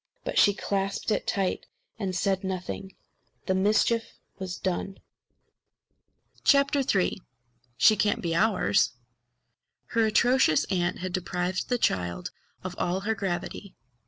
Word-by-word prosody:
But - - 0
she 205 - +5
clasped 200 +1 -2
it - - -1
tight 195 -2 -1 0.3
and 190 -3 -2
said 190 +1 0
nothing. 190 +1 -5 0.5
The 190 - +1
mischief 215 +4 +2 0.3
was 185 -2 -5
done. 190 +1 -3 1.5
III 280 - +2 0.6
She 215 - +6
Can't 210 0 +1
Be 170 -1 -2
Ours! 185 - +2 1.0
Her 230 -1 +2
atrocious 240 - +3
aunt 175 -1 0
had 185 0 -5
deprived 180 0 -2
the 245 - +2
child 90 - -1 0.3
of - - -5
all 180 +2 0
her 220 +3 0
gravity. 195 -1 -4
190 Hz, 120 wpm, -27 LUFS, 180-215 Hz, 1.5 s, She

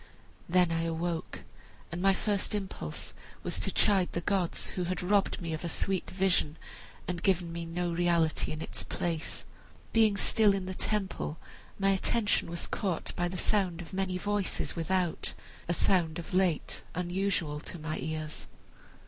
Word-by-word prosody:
Then 180 -1 +4
I 165 0 +1
awoke, 165 0 -2 0.5
and 170 +1 -3
my 195 0 +5
first 205 0 0
impulse 190 - -4 0.3
was - - 0
to - - 0
chide 195 -4 +3
the 170 - -1
gods 185 -1 0
who 180 - -2
had 180 +1 -2
robbed 200 +2 +2
me 165 -3 -3
of 160 - -4
a 170 - -1
sweet 190 +2 0
vision 185 -5 +2 0.5
and 175 -1 -2
given 175 -3 +2
me 170 0 -4
no 175 +1 -1
reality 170 -2 +2
in 155 +1 -3
its - - -3
place. 165 -2 -2 0.5
Being 220 -3 +5
still 210 -1 +5
in 190 -2 -2
the 185 - -3
temple, 190 -6 -1 0.4
my 195 0 +3
attention 205 +2 +2
was 170 0 -3
caught 190 -6 -2
by 175 - +1
the 185 +1 -4
sound 185 -3 +2
of 175 +1 -8
many 190 -1 0
voices 205 +1 -1
without; 175 0 0 0.3
a 170 - +2
sound 165 -4 +3
of 170 +3 -7
late 180 -4 +2
unusual 180 -4 0
to 175 - -4
my 155 -1 -3
ears. 155 +2 -4
180 Hz, 165 wpm, -31 LUFS, 165-195 Hz, 0.5 s, my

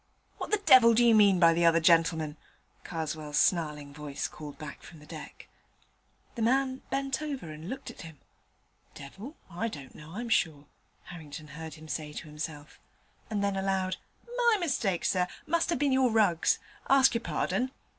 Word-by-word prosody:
'What - - -4
the 425 - +3
devil 255 - +7
do 240 +1 +5
you 230 - +6
mean 200 -4 +6
by 165 -1 +6
the 170 +1 +1
other 165 0 +5
gentleman?' 165 -2 +3 0.5
Karswell's 155 -2 -4
snarling 150 -5 +1
voice 145 -1 -4
called 150 -2 -10
back 150 -2 -8
from 165 - -13
the 150 - -15
deck. - - -10 0.9
The 235 - -5
man 260 +3 +1
bent 275 +1 -1
over 275 - -5
and 155 +4 -8
looked 265 +2 -6
at - - -12
him. 160 -3 -10 0.8
'The - - -10
devil? 200 - -9
Well, 175 -1 -11
I 230 - +1
don't 145 -11 -9
know, 155 +2 -12
I'm 235 +2 -4
sure,' 150 -8 +1 0.4
Harrington 155 -3 -10
heard 160 +2 -8
him 155 0 -13
say 150 -1 -4
to 155 - -7
himself, 150 -1 -7 0.5
and 205 -2 -1
then 200 -1 0
aloud, 190 -1 -1 0.4
'My 475 -3 +4
mistake, 220 - 0
sir; 180 -1 +2 0.2
must 335 +2 +1
have 340 - +1
been 280 +1 +1
your 260 -1 +4
rugs! 205 -7 +3 0.3
ask 270 -1 +6
your 230 - -1
pardon.' 255 +2 -1
175 Hz, 180 wpm, -29 LUFS, 155-240 Hz, 0.9 s, devil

